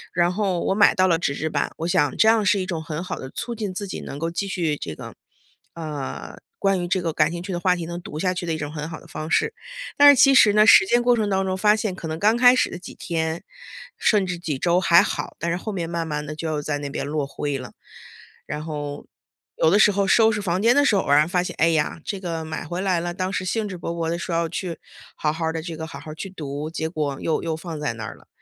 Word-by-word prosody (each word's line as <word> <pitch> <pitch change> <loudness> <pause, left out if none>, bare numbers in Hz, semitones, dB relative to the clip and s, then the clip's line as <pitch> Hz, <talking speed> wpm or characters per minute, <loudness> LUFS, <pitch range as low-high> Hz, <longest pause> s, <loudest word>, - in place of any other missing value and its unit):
然 175 +1 +2
后 195 -2 0
我 - - +1
买 205 0 +5
到 185 - +4
了 170 - +4
纸 140 -4 -1
质 160 - -2
版， - - -1
我 165 - -3
想 145 -5 +1
这 220 - +5
样 225 -1 +4
是 200 +1 +3
一 185 - -3
种 170 -4 -3
很 155 +1 -5
好 - - -5
地 130 - -8
促 235 - -5
进 210 -4 -4
自 200 +2 -5
己 - - -5
能 140 - -7
够 165 +2 -2
继 195 +4 -3
续 165 -5 -1
这 80 - -6
个 - - -9 0.6
呃， 150 -5 -6 0.2
关 195 -2 +1
于 175 - -3
这 185 +1 +1
个 165 -1 -1
感 150 0 +2
兴 175 - -4
趣 190 - -5
的 175 - -2
话 180 0 +2
题 170 -2 -5
能 170 +1 -5
读 155 - -7
下 185 +2 0
去 180 - -4
的 165 - -1
一 - - -4
种 145 -1 -5
很 150 0 -5
好 160 - -8
的 - - -16
方 155 +1 -6
式。 450 - +1 0.4
但 285 0 +9
是 260 - +2
其 275 -1 +7
实 215 -5 +7
呢， 210 0 +6
实 225 - +8
践 240 +5 +3
过 245 0 +4
程 215 -2 0
当 190 0 +1
中 185 0 -1
发 210 +2 +4
现 210 -3 -2
可 170 -3 -7
能 160 0 -4
刚 215 +5 +3
开 245 +1 +6
始 - - +2
的 175 - -6
几 180 - -10
天， 160 -1 -3 0.5
甚 205 -3 +3
至 180 -1 -3
几 155 -6 -3
周 175 +4 +2
还 170 -2 +6
好， - - -4
但 170 - -2
是 175 - 0
后 215 +4 -5
面 175 -4 -3
慢 170 0 -2
慢 150 -1 -3
地 155 - -5
就 160 +1 -4
要 155 -1 -1
在 145 0 -2
那 145 -1 -5
边 140 - -4
落 150 0 -1
灰 140 0 -3
了。 130 -1 -9 0.7
然 150 - -5
后 145 -2 -5 0.5
有 160 - +4
的 200 - +4
时 210 - +6
候 200 0 +1
收 225 +2 +5
拾 210 - -2
房 180 -1 0
间 235 +4 +4
的 285 - +5
时 230 - +3
候 195 - +2
偶 - - -4
然 150 +2 +5
发 180 0 +1
现， 180 0 -5
哎 165 - +4
呀， 155 0 0
这 200 - -3
个 165 -3 -4
买 160 0 -5
回 175 +4 -4
来 185 -3 +1
了， 175 +1 -3
当 185 0 -2
时 190 - -2
兴 210 +3 -1
致 185 -2 -7
勃 170 - -5
勃 165 -1 -2
地 170 - -2
说 170 0 -4
要 165 0 +1
去 170 0 -4 0.4
好 150 - 0
好 165 +1 -4
儿 160 - 0
地 165 - -3
这 165 -1 -6
个， 160 0 -5
好 165 - -9
好 155 - -10
儿 - - -8
去 190 +5 -7
读， 150 -3 -5
结 160 -1 -3
果 150 -4 -3
又 160 - 0
又 165 -1 -2
放 165 -1 -7
在 145 -5 -2
那 110 0 -7
儿 - - -7
了。 - - -22
170 Hz, 315 characters per minute, -23 LUFS, 155-195 Hz, 0.7 s, 但